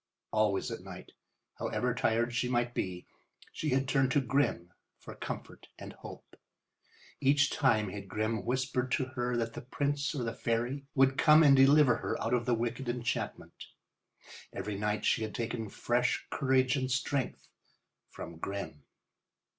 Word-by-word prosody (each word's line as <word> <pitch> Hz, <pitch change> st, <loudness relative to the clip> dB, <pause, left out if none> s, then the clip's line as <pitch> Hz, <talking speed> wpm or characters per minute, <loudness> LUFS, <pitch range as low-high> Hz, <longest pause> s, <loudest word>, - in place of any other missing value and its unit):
Always 105 Hz, -2 st, +1 dB
at -, -, -5 dB
night, -, -, -10 dB, 0.5 s
however -, -, -1 dB
tired 120 Hz, +2 st, +1 dB
she 125 Hz, +1 st, 0 dB
might 120 Hz, -1 st, 0 dB
be, 90 Hz, -4 st, -3 dB, 0.5 s
she 155 Hz, -, -3 dB
had 135 Hz, 0 st, +1 dB
turned 135 Hz, -1 st, +2 dB
to 145 Hz, -, +4 dB
Grimm 130 Hz, -10 st, 0 dB, 0.2 s
for -, -, -10 dB
comfort -, -, -7 dB
and -, -, -9 dB
hope. -, -, -12 dB, 0.8 s
Each 145 Hz, 0 st, +3 dB
time 110 Hz, -7 st, +2 dB
had 100 Hz, 0 st, -7 dB
Grimm 110 Hz, 0 st, -2 dB
whispered 125 Hz, +1 st, -1 dB
to 135 Hz, -, +1 dB
her 125 Hz, -2 st, -2 dB
that 115 Hz, -1 st, -2 dB
the -, -, -6 dB
prince 145 Hz, +4 st, -2 dB
or 130 Hz, -, -2 dB
the 115 Hz, -1 st, -2 dB
fairy 120 Hz, +5 st, -2 dB
would 135 Hz, 0 st, +4 dB
come 155 Hz, 0 st, +7 dB
and 140 Hz, -2 st, +7 dB
deliver 135 Hz, -1 st, +6 dB
her -, -, -3 dB
out 115 Hz, -, -1 dB
of 125 Hz, 0 st, 0 dB
the 120 Hz, -, +3 dB
wicked 120 Hz, +2 st, -3 dB
enchantment. 120 Hz, 0 st, -4 dB, 0.8 s
Every 105 Hz, -1 st, -4 dB
night 105 Hz, +1 st, -1 dB
she -, -, +2 dB
had 110 Hz, -, -4 dB
taken 115 Hz, -2 st, -3 dB
fresh 120 Hz, +4 st, 0 dB
courage 130 Hz, -1 st, +2 dB
and 130 Hz, -2 st, -1 dB
strength 130 Hz, +1 st, -2 dB, 0.6 s
from 85 Hz, 0 st, -9 dB
Grimm. 85 Hz, -6 st, -5 dB
125 Hz, 155 wpm, -31 LUFS, 115-135 Hz, 0.8 s, come